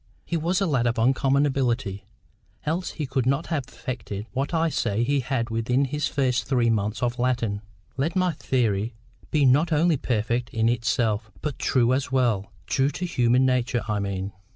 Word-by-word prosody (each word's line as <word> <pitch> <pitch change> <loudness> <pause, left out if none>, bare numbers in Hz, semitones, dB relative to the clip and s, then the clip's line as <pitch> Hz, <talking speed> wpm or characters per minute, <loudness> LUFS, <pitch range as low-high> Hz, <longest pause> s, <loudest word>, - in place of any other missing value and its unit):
He 170 - -2
was 170 +4 +1
a 195 - +1
lad 130 -8 +1
of 120 - 0
uncommon 135 +4 +3
ability, 120 -8 -1 0.6
else 165 +4 -1
he 155 - -3
could 130 -2 -1
not 140 +5 +1
have 140 -5 -1
effected 105 -5 -6
what 135 +3 -2
I 165 -1 +2
say 115 -6 0
he 140 +3 +1
had 125 -2 -2
within 125 +4 +1
his 150 +2 -1
first 130 -4 0
three 120 -4 +2
months 105 +1 -1
of 120 0 -1
Latin, 120 -5 0 0.4
let 155 +7 -1
my 185 -1 +2
theory 115 -7 0 0.3
be 150 -2 +3
not 145 +6 +4
only 160 +1 +3
perfect 120 0 -1
in 115 0 +2
itself, 115 -2 0
but 150 -2 -4
true 125 -1 +2
as 130 0 -1
well—true 120 - 0
to 180 - -4
human 125 -5 +3
nature, 125 -2 +1
I 105 -1 0
mean. 100 0 -3
125 Hz, 175 wpm, -25 LUFS, 115-140 Hz, 0.6 s, not